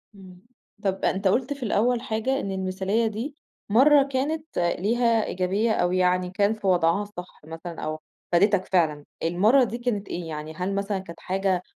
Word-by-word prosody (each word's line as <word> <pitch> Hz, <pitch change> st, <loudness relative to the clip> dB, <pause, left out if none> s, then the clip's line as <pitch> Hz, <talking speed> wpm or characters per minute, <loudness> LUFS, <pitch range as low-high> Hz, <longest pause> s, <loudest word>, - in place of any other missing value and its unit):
إمم. 185 Hz, -2 st, -14 dB, 0.4 s
طب 195 Hz, -1 st, -1 dB
أنت 195 Hz, +1 st, +1 dB
قُلت 250 Hz, +8 st, +1 dB
في 280 Hz, -2 st, -8 dB
الأول 235 Hz, +2 st, +1 dB
حاجة، 255 Hz, +2 st, -1 dB
إن 195 Hz, -, -3 dB
المثالية 190 Hz, +4 st, 0 dB
دي 230 Hz, +7 st, -4 dB, 0.3 s
مرّة 275 Hz, +7 st, +6 dB
كانت 280 Hz, +3 st, -2 dB
ليها 225 Hz, +6 st, +2 dB
إيجابية 195 Hz, +5 st, 0 dB
أو 175 Hz, -4 st, +1 dB
يعني 180 Hz, 0 st, +2 dB
كان 200 Hz, +3 st, +2 dB
في 215 Hz, -3 st, -5 dB
وضعها 180 Hz, +2 st, +3 dB
صح 180 Hz, -3 st, -10 dB
مثلًا 165 Hz, +1 st, -8 dB
أو 155 Hz, 0 st, -3 dB, 0.3 s
فادتك 195 Hz, +2 st, +3 dB
فعلًا، 155 Hz, -6 st, +1 dB, 0.2 s
المرّة 210 Hz, +11 st, +4 dB
دي 235 Hz, 0 st, -2 dB
كانت 230 Hz, -5 st, -2 dB
إيه 170 Hz, -1 st, -5 dB
يعني؟ 155 Hz, 0 st, -6 dB
هل 185 Hz, +3 st, -2 dB
مثلًا 200 Hz, 0 st, -1 dB
كانت 170 Hz, -3 st, -10 dB
حاجة 190 Hz, -1 st, 0 dB
195 Hz, 170 wpm, -25 LUFS, 180-230 Hz, 0.4 s, مرّة